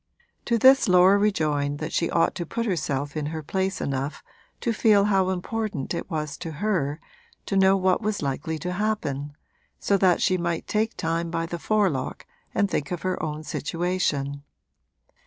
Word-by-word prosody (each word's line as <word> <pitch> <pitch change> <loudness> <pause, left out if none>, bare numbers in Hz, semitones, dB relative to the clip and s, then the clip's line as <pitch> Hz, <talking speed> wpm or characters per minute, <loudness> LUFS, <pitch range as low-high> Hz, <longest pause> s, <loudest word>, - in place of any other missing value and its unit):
To 235 - +2
this 265 0 +6
Laura 180 +2 +6
rejoined 150 -8 +1
that 155 +1 -5
she 170 - +1
ought 165 - +2
to 175 - -4
put 230 +7 -3
herself 145 -8 -2
in 150 -2 -2
her 155 0 -5
place 190 +4 -1
enough 140 +1 -3 0.4
to 235 - 0
feel 210 -2 +4
how 195 -2 +2
important 190 - -3
it 170 - -4
was 150 -4 -3
to 165 -3 -6
her 160 -4 -1 0.5
to 195 - -2
know 190 0 +5
what 185 +1 +2
was 210 -5 -2
likely 145 +4 -2
to 180 - -1
happen, 150 -9 -2 0.4
so 200 - +2
that 185 -2 +3
she 185 -2 +2
might 170 -1 -2
take 220 +1 -1
time 165 +1 -1
by 165 0 -2
the 170 0 -5
forelock 195 -9 0 0.3
and 200 - +3
think 150 -6 -2
of 175 -2 -4
her 185 -1 -1
own 155 0 -4
situation. 155 -4 -2
175 Hz, 175 wpm, -25 LUFS, 150-200 Hz, 0.5 s, this